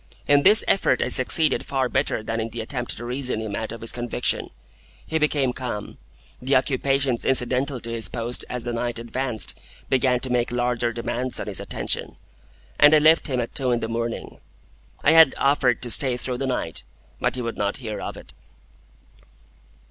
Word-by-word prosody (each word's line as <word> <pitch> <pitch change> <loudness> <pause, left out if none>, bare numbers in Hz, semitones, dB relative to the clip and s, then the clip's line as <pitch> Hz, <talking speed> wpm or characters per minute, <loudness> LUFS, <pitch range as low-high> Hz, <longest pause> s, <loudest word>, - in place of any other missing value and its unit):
In 145 0 +5
this 210 +7 +7
effort 195 - +2
I - - -2
succeeded 150 +4 +4
far 135 -2 -1
better 110 -2 -1
than 115 +1 -3
in 115 0 -3
the 115 0 -6
attempt 120 +1 -4
to 120 - -7
reason 125 -1 -3
him 110 -2 -4
out 110 +1 -4
of 115 - -8
his 115 - 0
conviction. 120 -1 -2 0.6
He 160 - -1
became 145 -4 +1
calm; 120 -6 -6 0.4
the 135 +2 +1
occupations 135 -1 +1
incidental 130 +1 0
to 115 - -4
his 115 -1 -1
post 120 0 -3
as 125 -1 -4
the 120 - -3
night 120 0 -2
advanced 120 0 -3 0.3
began 130 -1 +2
to 130 - -3
make 120 -1 0
larger 120 -1 0
demands 120 +2 -3
on - - -4
his - - -5
attention: - - -3 0.6
and 150 +1 +7
I - - +7
left 160 +2 +4
him 130 -4 -1
at 120 - -4
two 130 -2 +1
in 120 -1 +1
the 115 - -3
morning. 115 0 -4 0.6
I 145 - +5
had 160 -3 +7
offered 135 -4 +2
to 120 - -1
stay 130 -1 +4
through 125 0 -2
the 135 - -2
night, 125 -10 -2 0.4
but - - 0
he 125 - -3
would 115 0 -4
not 100 0 -1
hear 110 -5 -6
of - - -6
it. - - -9
125 Hz, 190 wpm, -23 LUFS, 115-135 Hz, 0.6 s, this